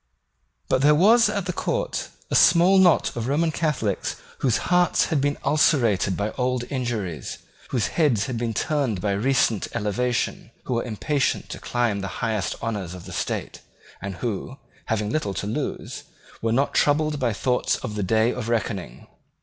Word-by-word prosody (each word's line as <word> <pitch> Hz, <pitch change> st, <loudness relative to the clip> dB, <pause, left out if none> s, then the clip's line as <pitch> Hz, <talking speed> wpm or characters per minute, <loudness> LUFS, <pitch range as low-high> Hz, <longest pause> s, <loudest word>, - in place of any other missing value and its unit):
But 130 Hz, -, +2 dB
there 150 Hz, +2 st, +6 dB
was 225 Hz, +8 st, +5 dB
at 200 Hz, -3 st, -2 dB
the 180 Hz, -, -2 dB
court -, -, -2 dB, 0.2 s
a -, -, +1 dB
small 175 Hz, +3 st, +6 dB
knot 175 Hz, -5 st, +4 dB
of 120 Hz, 0 st, -3 dB
Roman 160 Hz, +4 st, +1 dB
Catholics 150 Hz, -, -1 dB, 0.2 s
whose 125 Hz, -5 st, +1 dB
hearts 180 Hz, 0 st, +4 dB
had 145 Hz, -, +2 dB
been 145 Hz, +1 st, 0 dB
ulcerated 120 Hz, -, +2 dB
by 105 Hz, +1 st, -1 dB
old 125 Hz, -1 st, 0 dB
injuries, 115 Hz, -, -3 dB, 0.3 s
whose 120 Hz, -5 st, 0 dB
heads 135 Hz, -11 st, +2 dB
had 130 Hz, -, -4 dB
been 115 Hz, -1 st, -2 dB
turned 135 Hz, -9 st, 0 dB
by 100 Hz, +2 st, -1 dB
recent 115 Hz, 0 st, +1 dB
elevation, 120 Hz, +3 st, -1 dB, 0.2 s
who -, -, -2 dB
were 115 Hz, -, 0 dB
impatient 135 Hz, +5 st, -1 dB
to -, -, -6 dB
climb 120 Hz, -4 st, 0 dB
to -, -, -4 dB
the 95 Hz, -, -3 dB, 0.2 s
highest 110 Hz, -4 st, -1 dB
honours 100 Hz, -6 st, -3 dB
of 90 Hz, -, -10 dB
the -, -, -8 dB
state, -, -, -3 dB, 0.4 s
and 95 Hz, 0 st, -5 dB
who, 120 Hz, +5 st, -4 dB, 0.3 s
having 105 Hz, -2 st, -1 dB
little 105 Hz, -10 st, -1 dB
to -, -, -3 dB
lose, 115 Hz, +8 st, -4 dB, 0.4 s
were 115 Hz, -, 0 dB
not 135 Hz, +5 st, +1 dB
troubled 150 Hz, 0 st, +2 dB
by 125 Hz, -3 st, +1 dB
thoughts 125 Hz, +4 st, 0 dB
of 120 Hz, -5 st, -5 dB
the 105 Hz, -, -3 dB
day 110 Hz, +4 st, +2 dB
of 115 Hz, -2 st, -5 dB
reckoning. 100 Hz, -, -3 dB
120 Hz, 175 wpm, -24 LUFS, 105-145 Hz, 0.4 s, there